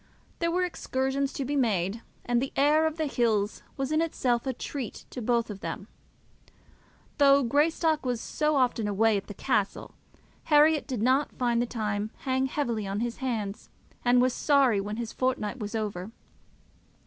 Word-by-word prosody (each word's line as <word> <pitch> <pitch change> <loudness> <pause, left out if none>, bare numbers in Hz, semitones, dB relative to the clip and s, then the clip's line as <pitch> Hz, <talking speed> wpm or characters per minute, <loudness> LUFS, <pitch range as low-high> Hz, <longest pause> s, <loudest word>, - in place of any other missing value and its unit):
There 335 - +1
were 360 +2 +1
excursions 270 -5 -1
to 275 - -3
be 290 +3 -2
made, 215 -5 0 0.2
and 240 0 +1
the 270 - -3
air 300 +3 +4
of 315 0 -4
the 315 - 0
hills 220 -6 0 0.2
was 270 +1 -2
in 310 +1 +2
itself 255 -6 0
a 260 - 0
treat 255 -1 -6
to 250 - -6
both 235 -1 +1
of 200 - -8
them. 180 +3 -5 1.3
Though 280 -1 +6
Greystock 310 +4 +2
was 250 -3 -1
so 300 +5 0
often 245 -5 +1
away 215 +2 +3
at 200 - -3
the 205 - -8
castle, 210 -5 -1 0.5
Herriot 300 0 +4
did 250 -6 -2
not 265 +4 +2
find 240 -2 +1
the 240 - -1
time 210 -2 -2
hang 260 0 0
heavily 235 -7 -2
on 200 +2 -2
his 235 0 -2
hands, 220 -6 -3 0.3
and 245 0 +4
was 255 0 +3
sorry 270 -8 +3
when 210 +2 -5
his 235 -1 -4
fortnight 255 -2 -1
was 210 +1 -5
over. 205 -3 -3
245 Hz, 170 wpm, -28 LUFS, 215-280 Hz, 1.3 s, Though